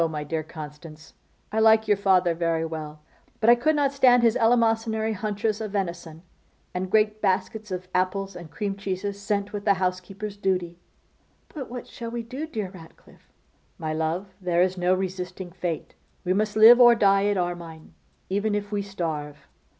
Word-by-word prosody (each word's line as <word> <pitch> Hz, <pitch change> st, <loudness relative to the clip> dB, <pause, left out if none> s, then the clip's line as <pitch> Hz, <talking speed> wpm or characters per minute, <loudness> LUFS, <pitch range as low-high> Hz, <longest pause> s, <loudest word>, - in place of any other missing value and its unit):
my 150 Hz, -1 st, -4 dB
dear 155 Hz, +2 st, -2 dB
Constance, 155 Hz, -1 st, -11 dB, 0.4 s
I 220 Hz, -, 0 dB
like 220 Hz, 0 st, +5 dB
your 205 Hz, -, +4 dB
father 185 Hz, -3 st, +3 dB
very 165 Hz, -1 st, 0 dB
well, 155 Hz, -2 st, -7 dB, 0.4 s
but 230 Hz, +1 st, +5 dB
I -, -, +8 dB
could 305 Hz, +6 st, +1 dB
not 280 Hz, -2 st, +1 dB
stand 250 Hz, -3 st, +5 dB
his 230 Hz, 0 st, +4 dB
eleemosynary 225 Hz, -2 st, +2 dB
haunches 210 Hz, +1 st, -2 dB
of 215 Hz, -2 st, -5 dB
venison, 170 Hz, -4 st, -4 dB, 0.5 s
and 185 Hz, +1 st, -3 dB
great 215 Hz, +1 st, +2 dB
baskets 210 Hz, +2 st, -1 dB
of 185 Hz, -1 st, -5 dB
apples 190 Hz, +1 st, -1 dB
and 170 Hz, -2 st, -9 dB
cream 200 Hz, +2 st, -3 dB
cheeses 200 Hz, 0 st, -4 dB
sent 200 Hz, 0 st, -2 dB
with 205 Hz, -1 st, -4 dB
the 200 Hz, -1 st, +3 dB
housekeeper's 190 Hz, +3 st, -3 dB
duty.' 180 Hz, -3 st, -1 dB, 0.7 s
'But 280 Hz, -5 st, -7 dB
what 245 Hz, 0 st, -7 dB
shall 230 Hz, -1 st, -7 dB
we 235 Hz, 0 st, -4 dB
do, 265 Hz, +7 st, -6 dB
dear 215 Hz, -, -4 dB
Ratcliffe?' 165 Hz, -4 st, -17 dB, 0.5 s
'My 155 Hz, -1 st, -3 dB
love, 160 Hz, +5 st, -2 dB
there 175 Hz, -1 st, +2 dB
is 185 Hz, 0 st, 0 dB
no 180 Hz, 0 st, +2 dB
resisting 185 Hz, -1 st, -5 dB
fate. 175 Hz, -3 st, -4 dB, 0.3 s
We 180 Hz, -, +2 dB
must 210 Hz, +2 st, 0 dB
live 230 Hz, +3 st, +9 dB
or 240 Hz, -1 st, +8 dB
die 200 Hz, -2 st, +3 dB
at 205 Hz, -1 st, +1 dB
Armine, 170 Hz, -3 st, -5 dB, 0.3 s
even 205 Hz, +2 st, 0 dB
if 205 Hz, 0 st, -4 dB
we 205 Hz, -1 st, -1 dB
starve. 155 Hz, -7 st, -5 dB
195 Hz, 175 wpm, -25 LUFS, 175-215 Hz, 0.7 s, live